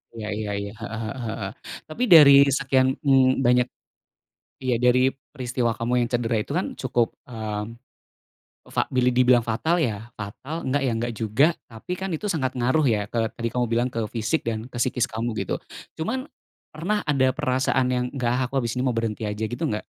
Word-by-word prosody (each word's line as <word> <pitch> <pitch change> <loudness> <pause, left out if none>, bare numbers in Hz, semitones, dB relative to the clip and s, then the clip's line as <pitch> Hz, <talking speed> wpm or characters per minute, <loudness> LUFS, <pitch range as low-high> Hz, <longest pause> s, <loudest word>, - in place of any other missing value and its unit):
Iya 110 -2 -5
iya 105 -1 -3
iya. 100 0 -5
Heeh 115 +1 -5
heeh 110 +5 -5
heeh. 105 -2 -4 0.4
Tapi, 155 +11 -3
dari 145 -3 +10 0.3
sekian, 130 -1 +2 0.2
mmm, 135 -1 +4
banyak 125 0 +4 1.0
iya, 125 -2 +2
dari 125 +1 +5 0.2
peristiwa 125 -3 -1
kamu 115 +1 -2
yang - - -4
cedera 120 -1 0
itu 140 - -7
kan - - -1
cukup, 120 -3 +1 0.2
mmm, 110 -5 -4 1.1
fa - - +2
boleh 125 0 +3
dibilang 125 -1 +5
fatal 160 +10 +1
ya, 115 -5 -2
fatal, 105 +9 -7
enggak, 140 +2 +1
ya - - +1
enggak 120 +1 -2
juga, 110 +7 +3 0.2
tapi 115 +10 -8
kan 190 0 -3
itu 185 +7 -4
sangat 140 -9 -1
ngaruh 130 +6 +2
ya 105 -1 -2
ke 115 0 -1
tadi 115 - -2
kamu 125 -1 0
bilang, 120 +2 +2
ke - - -2 0.2
fisik, 115 +8 0
dan 110 0 -2
ke - - -10
psikis 125 +1 +1
kamu, 115 +2 -3
gitu. - - -2 0.4
Cuman, 255 - -2 0.5
pernah 190 +7 -1
ada 135 -2 +3
perasaan 130 0 +1
yang, 125 0 0
"Nggak 125 -3 0
ah, - - 0
aku - - -11
habis 115 -2 -1
ini 125 - 0
mau 125 - +2
berhenti 115 -1 -2
aja." 105 +1 -3
Gitu, 120 - -6
nggak? 105 0 -2
125 Hz, 190 wpm, -24 LUFS, 115-130 Hz, 1.1 s, dari